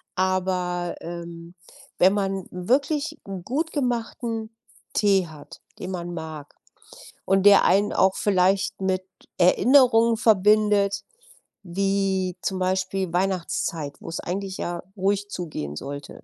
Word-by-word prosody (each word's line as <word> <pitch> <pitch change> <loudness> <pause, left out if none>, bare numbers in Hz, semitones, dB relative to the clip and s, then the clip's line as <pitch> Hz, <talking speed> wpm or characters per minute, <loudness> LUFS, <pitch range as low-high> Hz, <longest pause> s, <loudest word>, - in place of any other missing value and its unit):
Aber, 180 -1 -1
ähm, 170 0 -8 0.5
wenn 185 +2 +6
man 195 -2 -2
wirklich 285 - 0
'n 190 -3 -6
gut 310 - -2
gemachten 235 -4 -2 0.4
Tee 195 -4 +3
hat, 155 -2 -13 0.2
den 185 - -6
man 175 -1 -5
mag 160 -3 -8 0.7
und 195 0 +2
der 200 -1 +8
einen 205 +2 +3
auch 190 0 +3
vielleicht 195 0 +1
mit 190 -1 0 0.4
Erinnerungen 230 +4 +5
verbindet 210 -1 +3 0.6
wie 190 0 -1
zum 190 -1 -2
Beispiel 185 0 -1
Weihnachtszeit, 175 -5 -1
wo's 165 0 -6
eigentlich 190 +1 -4
ja 175 0 -4
ruhig 200 +1 0
zugehen 150 - -5
sollte. 140 - -8
190 Hz, 115 wpm, -24 LUFS, 175-205 Hz, 0.7 s, der